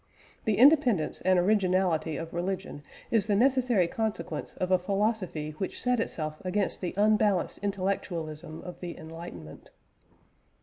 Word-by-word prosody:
The 215 -2 +1
independence 255 - +4
and 185 0 +3
originality 180 -5 +2
of 165 0 -6
religion 180 -2 -3 0.3
is 220 -4 +3
the 205 - +2
necessary 250 -4 +3
consequence 220 +3 -3
of 185 0 -2
a 185 - +5
philosophy 195 -5 -1
which 190 - -3
set 250 -1 +2
itself 155 -7 -3
against 190 +2 -1
the 180 - -3
unbalanced 210 -2 +2
intellectualism 175 -5 -3
of 180 - -9
the 175 -2 -6
"enlightenment." 160 - -10
185 Hz, 130 wpm, -28 LUFS, 170-210 Hz, 0.3 s, a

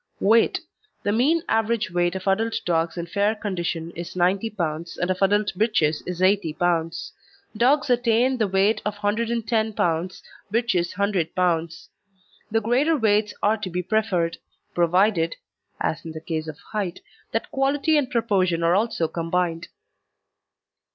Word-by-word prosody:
WEIGHT 225 +3 +3 0.4
The 205 - +1
mean 290 +10 +2
average 225 -3 0
weight 175 +1 +1
of 190 - -5
adult 225 +4 +1
dogs 165 0 0
in 170 - -3
fair 200 +5 +1
condition 175 -5 -3
is 170 +1 -7
90 185 +5 +1
pounds 170 -5 -4
and 180 +1 0
of 185 - -3
adult 205 +1 +3
bitches 180 -8 +2 0.2
80 185 -4 +2
pounds. 165 0 -1 0.4
Dogs 260 +7 +3
attain 245 +1 +2
the 215 - +2
weight 195 +3 +2
of 210 0 -2
110 220 +1 0
pounds, 175 0 -1 0.3
bitches 210 -7 0
100 200 -5 0
pounds. 170 -2 -1 0.6
The 225 0 +1
greater 265 +9 +2
weights 210 -3 +2
are 215 +2 +3
to 210 -3 -5
be 180 +1 -2
preferred, 180 -5 0 0.3
provided 175 0 +2 0.4
(as 165 +1 -2
in 160 - -7
the 160 - -6
case 160 -1 -3
of 155 -2 -7
height) 200 -5 -3 0.3
that - - -2
quality 280 +3 +1
and 285 -4 +2
proportion 190 -8 +1
are 165 +1 +4
also 200 -4 +1
combined. 165 0 -2
195 Hz, 145 wpm, -24 LUFS, 170-225 Hz, 0.6 s, are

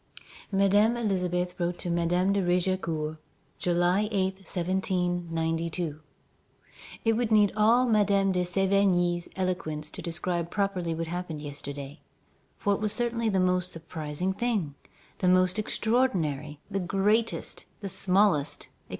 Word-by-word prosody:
Madame 205 +4 +4
Elisabeth 180 -5 -1
wrote 175 0 -1
to - - -5
Madame 175 +3 +2
de 200 - +1
Raigecourt, 175 -4 0 0.4
July 180 +4 +2
8, 190 -2 0
1792: 175 -4 -1 1.1
"It 225 - +4
would 230 0 -1
need 210 -2 +5
all 230 +4 +4
Madame 200 -4 +3
de 180 -1 +1
Sévigné's 180 -1 +2
eloquence 155 -5 -2
to - - -8
describe 170 0 -2
properly 185 -5 -1
what 165 +1 -2
happened 175 -2 -4
yesterday; 145 0 -7 0.6
for 205 - +1
it - - -1
was 210 -1 0
certainly 235 -1 0
the 195 -2 +1
most 180 0 +1
surprising 160 +2 -3
thing, 205 -10 -1 0.5
the 185 - +1
most 185 +2 +3
extraordinary, 175 - 0
the 195 - 0
greatest, 205 +5 0 0.2
the 200 - -4
smallest, 185 -5 +2
etc. - - -35
180 Hz, 125 wpm, -28 LUFS, 170-200 Hz, 1.1 s, need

